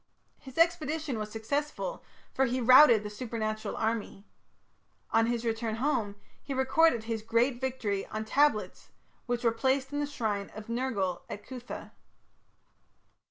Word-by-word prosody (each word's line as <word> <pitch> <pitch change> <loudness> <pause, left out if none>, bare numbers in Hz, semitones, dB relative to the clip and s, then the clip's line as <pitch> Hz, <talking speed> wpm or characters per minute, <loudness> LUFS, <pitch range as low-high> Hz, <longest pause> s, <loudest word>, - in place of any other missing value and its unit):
His 265 -3 -13
expedition 320 -6 +1
was 215 0 -4
successful, 290 - -3 0.3
for 265 - +2
he 255 +1 -1
routed 250 -2 +7
the 210 - -5
supernatural 215 -1 -3
army. 220 -2 -2 0.9
On 225 0 +3
his 240 0 -1
return 225 -1 -1
home, 230 -5 -1 0.3
he 275 - -5
recorded 265 -1 +3
his 225 -1 -3
great 240 +3 +1
victory 230 -7 -2
on 215 0 -4
tablets 280 -1 +1 0.4
which 245 0 -1
were 230 - +4
placed 265 +4 0
in 290 - -1
the 290 - -1
shrine 215 -8 -2
of 215 +1 -9
Nergal 230 -7 -1
at 205 - -7
Cuthah. 255 -1 -8
235 Hz, 140 wpm, -30 LUFS, 220-265 Hz, 0.9 s, routed